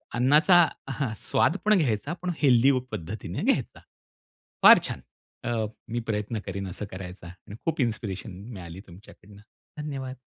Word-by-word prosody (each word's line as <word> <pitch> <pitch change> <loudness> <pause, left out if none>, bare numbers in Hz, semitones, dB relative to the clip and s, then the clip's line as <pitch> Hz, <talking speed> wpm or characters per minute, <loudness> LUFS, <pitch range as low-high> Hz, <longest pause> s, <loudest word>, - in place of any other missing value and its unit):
अन्नाचा 150 +8 +6 0.2
हां 135 -3 -2
स्वाद 175 - +1
पण 215 -1 +5
घ्यायचा, 140 - 0
पण 180 0 -1
हेल्थी 130 -2 +5 0.2
पद्धतीने 90 +2 -5
घ्यायचा. - - 0 0.8
फार - - +10
छान, - - -6 0.4
अ, 120 0 -1 0.4
मी 120 - -1
प्रयत्न 105 0 -2
करीन 100 0 -4
असं 95 +3 -6
करायचा 90 -1 -8
आणि 95 +4 -12
खूप 160 -3 0
इन्स्पिरेशन 110 -4 -3
मी 95 +5 -10
मिळाली 90 -3 -9
तुमच्याकडून 100 +2 -15
धन्यवाद. 135 +5 -8
110 Hz, 140 wpm, -26 LUFS, 95-140 Hz, 0.8 s, फार